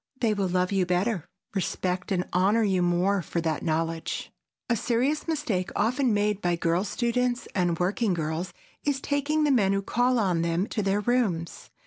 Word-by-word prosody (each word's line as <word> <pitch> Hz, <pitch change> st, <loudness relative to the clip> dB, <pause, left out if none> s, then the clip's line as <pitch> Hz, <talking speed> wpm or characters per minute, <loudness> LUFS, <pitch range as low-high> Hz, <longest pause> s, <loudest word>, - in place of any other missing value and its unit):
They 225 Hz, -3 st, +2 dB
will 200 Hz, -2 st, 0 dB
love 180 Hz, +1 st, 0 dB
you 195 Hz, -2 st, +2 dB
better, 180 Hz, 0 st, 0 dB, 0.3 s
respect 185 Hz, 0 st, -2 dB
and 180 Hz, -2 st, 0 dB
honor 200 Hz, +5 st, +3 dB
you 190 Hz, -3 st, +2 dB
more 180 Hz, +3 st, +2 dB
for 170 Hz, +1 st, -3 dB
that 160 Hz, -2 st, -1 dB
knowledge. 165 Hz, 0 st, -2 dB, 0.4 s
A 235 Hz, -, +2 dB
serious 255 Hz, +8 st, 0 dB
mistake 265 Hz, -, -1 dB
often 250 Hz, +4 st, +2 dB
made 210 Hz, -1 st, +1 dB
by 175 Hz, -1 st, +1 dB
girl 170 Hz, +2 st, +1 dB
students 245 Hz, +4 st, -1 dB
and 175 Hz, -3 st, +1 dB
working 190 Hz, +3 st, +1 dB
girls 160 Hz, +2 st, -3 dB, 0.3 s
is 285 Hz, -2 st, 0 dB
taking 285 Hz, +3 st, 0 dB
the 295 Hz, -, +3 dB
men 200 Hz, -7 st, +3 dB
who 195 Hz, 0 st, 0 dB
call 245 Hz, +4 st, +2 dB
on 185 Hz, -7 st, +1 dB
them 170 Hz, +2 st, 0 dB
to 215 Hz, -, -1 dB
their 200 Hz, +1 st, +1 dB
rooms. 205 Hz, -9 st, -1 dB
195 Hz, 175 wpm, -27 LUFS, 175-240 Hz, 0.4 s, honor